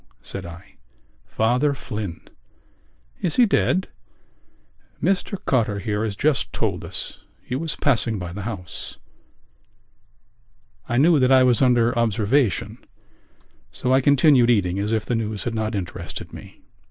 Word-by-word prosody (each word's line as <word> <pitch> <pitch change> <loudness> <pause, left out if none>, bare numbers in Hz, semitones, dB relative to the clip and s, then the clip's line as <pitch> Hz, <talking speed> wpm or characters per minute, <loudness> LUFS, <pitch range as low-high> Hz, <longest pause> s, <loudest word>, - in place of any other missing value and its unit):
said 95 -2 -7
I. 90 +4 -13 0.5
"Father 125 +6 +1
Flynn." 105 -9 -6 1.0
"Is 170 - -1
he 250 - +6
dead?" 190 -2 +1 1.1
"Mr 195 +2 0
Cotter 110 -6 +1
here 105 +2 -2
has 105 -3 -2
just 145 +6 0
told - - -2
us. - - -7 0.2
He 125 - -4
was 160 +3 -3
passing 115 -5 +1
by 90 -2 -6
the 100 - -6
house." 95 -5 -7 1.9
I 120 - 0
knew 155 +3 +5
that 130 0 +3
I 130 -1 +7
was 125 -1 +3
under 120 -2 +3
observation 115 - 0 0.9
so 125 - -1
I 130 - +4
continued 140 -3 +5
eating 95 -5 +2
as 105 +2 -1
if 110 -1 0
the - - -2
news 110 -3 -2
had 120 - -3
not 110 0 -2
interested 90 -3 -6
me. - - -12
115 Hz, 140 wpm, -23 LUFS, 105-135 Hz, 1.9 s, I